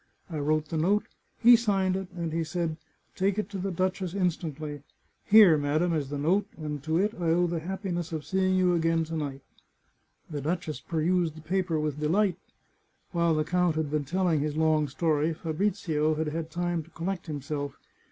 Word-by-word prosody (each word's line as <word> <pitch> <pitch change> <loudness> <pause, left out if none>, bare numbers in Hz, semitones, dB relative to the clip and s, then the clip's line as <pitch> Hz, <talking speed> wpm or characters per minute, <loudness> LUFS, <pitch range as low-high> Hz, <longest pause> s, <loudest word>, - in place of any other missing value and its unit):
I 155 - -3
wrote 155 +1 0
the 165 - -2
note, 200 +6 +2 0.3
he 240 +1 +8
signed 195 -5 +1
it, 190 0 -3
and 165 -2 -3
he 165 0 0
said, 160 0 -2 0.2
' - - -41
Take 195 +1 +1
it 210 -1 -2
to 195 - -4
the 195 +2 -2
duchess 185 0 -1
instantly.' 155 -6 -2 0.4
Here, 205 -7 +7
madam, 155 +4 +1
is 145 -4 -1
the 145 - -3
note, 185 +8 +1
and 150 -2 -4
to 160 0 +1
it 205 +4 +1
I - - -1
owe 175 +2 +3
the 170 -1 -1
happiness 175 -1 -4
of 155 -2 -4
seeing 190 -1 +1
you 180 -1 +3
again 165 -1 +2
to 165 +1 -5
night." 140 -3 -4 0.9
The 150 -3 -5
duchess 155 -2 -2
perused 165 +3 0
the 160 - -10
paper 175 0 0
with 150 -1 -2
delight. 180 +4 +1 0.7
While 170 -2 +2
the 155 - +1
count 180 0 +1
had 155 -2 -1
been 150 -1 0
telling 175 +1 +1
his 150 +1 -2
long 155 -1 +3
story 155 +2 0
Fabrizio 160 -2 0
had 155 0 -1
had 160 +1 -4
time 175 0 -1
to 160 - -16
collect 175 +2 -4
himself. 145 -1 -4
165 Hz, 190 wpm, -28 LUFS, 155-185 Hz, 0.9 s, he